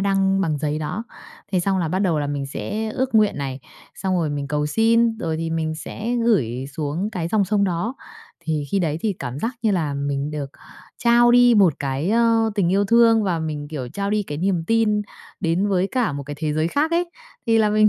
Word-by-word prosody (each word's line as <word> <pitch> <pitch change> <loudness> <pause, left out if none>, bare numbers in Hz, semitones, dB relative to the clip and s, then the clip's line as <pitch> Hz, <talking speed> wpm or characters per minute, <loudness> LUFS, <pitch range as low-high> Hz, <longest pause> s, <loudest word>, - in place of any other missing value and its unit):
đăng 195 0 +2
bằng 155 -5 0
giấy 150 +1 -1
đó. 180 +9 -4 0.5
Thế 185 - +2
xong 190 +1 0
là 165 - -1
bắt 185 +4 -1
đầu 175 -6 +1
là 145 - -1
mình 145 -1 -3
sẽ 215 +9 -4
ước 260 +1 -2
nguyện 215 -6 +4
này, 135 -1 -4 0.3
xong 190 -1 -2
rồi 155 -3 0
mình 140 -1 -3
cầu 150 0 0
xin, 225 +5 +2
rồi 160 -1 -2
thì 165 0 -3
mình 160 -1 -1
sẽ 225 +9 -4
gửi 130 - +1
xuống 155 +8 -3
cái 170 -5 -3
dòng 210 +1 +2
sông 200 0 +1
đó. 185 +7 -1 0.5
Thì 155 -3 -2
khi 200 - +1
đấy 160 -3 -1
thì 215 0 0
cảm 125 +2 -5
giác 230 - -2
như 220 - +2
là 160 -7 0
mình 140 +1 -2
được 145 -2 -5 0.5
trao 240 0 +5
đi 245 0 +6
một 190 -8 +5
cái, 140 +5 -2
ơ, 230 0 +3
tình 195 -5 +1
yêu 200 +1 +3
thương 230 +1 +5
và 180 -5 0
mình, 150 -2 -4
kiểu, 140 -5 -5
trao 200 +9 -3
đi 210 0 +1
cái 150 -6 -6
niềm 175 -2 0
tin 215 -1 +2 0.4
đến 175 +5 +1
với 190 -1 +1
cả 245 - 0
một 140 - -4
cái 145 +1 -7
thế 155 -1 -1
giới 155 +2 0
khác 300 - 0
ấy. 340 +1 0 0.4
Thì 225 -1 +4
là 210 -1 +3
mình 215 0 +5
185 Hz, 230 wpm, -22 LUFS, 150-220 Hz, 0.5 s, đi